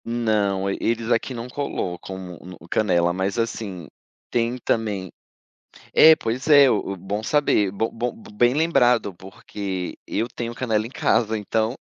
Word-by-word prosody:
Não, 105 -5 0
e 95 - -2
eles 115 0 -1
aqui 115 +3 +1
não 120 -1 -5
colocam 95 -9 -4 0.3
um 90 +1 -10
no 80 - -15
canela. 85 -5 +2
Mas 95 +3 -2
assim, 105 -7 -3 0.4
tem 120 +1 0
também 105 -6 -2 0.8
É 160 0 +9
pois 130 0 -4
é, 145 -3 +7
o 105 -3 -1
o - - -5
bom 100 +4 -4
saber, 110 -7 +2
bom 105 +4 -2
bom 120 +1 -3 0.2
bem 120 +2 +4
lembrado 125 - +2
porque 95 0 -6
eu 115 +3 -2
tenho 120 -1 -5
canela 110 -3 -1
em - - -10
casa, 110 -4 +1
então, 110 +3 -1
110 Hz, 155 wpm, -23 LUFS, 95-120 Hz, 0.8 s, É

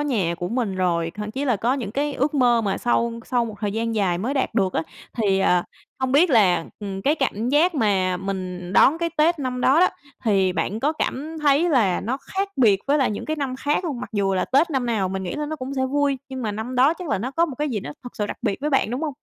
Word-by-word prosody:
nhà 215 - 0
của 175 +1 -4
mình 230 -4 -1
rồi, 170 -3 0
thậm 210 0 -5
chí 270 +6 -3
là 250 -5 +2
có 235 +6 +1
những 240 -8 -4
cái 285 +2 -1
ước 285 +3 0
mơ 245 -4 +4
mà 200 -3 -1
sau 235 -1 +1
sau 245 -2 0
một 220 -2 -6
thời 205 -2 -1
gian 225 +1 -2
dài 190 -5 +1
mới 240 +9 -2
đạt 265 -4 -1
được 195 -4 +1
á. - - 0 0.3
Thì, 200 -4 +2
ờ, 180 -2 +3 0.4
hông 260 -1 -1
biết 315 +5 +5
là, 190 -9 +4
ừm, 195 -2 -5
cái 290 +7 +3
cảm 240 -6 -1
giác 315 +6 +3
mà 195 -8 +1
mình 185 -1 -5
đón 275 +10 +5
cái 335 0 -1
Tết 320 +2 +3
năm 255 -2 -3
đó 275 +6 +4
đó, 365 - +6 0.4
thì 195 -4 +2
bạn 210 +4 -2
có 295 +5 +1
cảm 310 +1 -3
thấy 295 +4 +4
là 220 - +2
nó 245 +5 -2
khác 390 +7 -3
biệt 210 -7 +4
với 285 +2 +3
lại 265 - +2
những 205 - -4
cái 310 - -2
năm 270 -3 -3
khác 295 +6 0
hông? 285 -8 -3
Mặc - - -7
dù 195 -2 +1
là 185 - +1
Tết 295 +6 +2
năm 265 -4 -1
nào 215 -5 0
mình 190 +1 -3
nghĩ 180 - -4
là 300 0 -3
nó 310 +1 -4
cũng 265 -1 -5
sẽ 260 -1 0
vui, 280 0 +1
nhưng 260 -1 -5
mà 215 -2 -2
năm 220 +5 -5
đó 265 +6 +4
chắc 355 -1 -8
là - - 0
nó 240 +7 -3
có 330 +5 +2
một 290 - -6
cái 300 0 0
gì 225 -6 -2
nó 145 - -7
thật 245 - -10
sự 210 - -1
đặc - - -5
biệt 195 - 0
với 300 +2 -1
bạn, 270 -6 +2
đúng 250 +5 -3
hông? 295 -4 -3
245 Hz, 275 wpm, -23 LUFS, 200-285 Hz, 0.4 s, đó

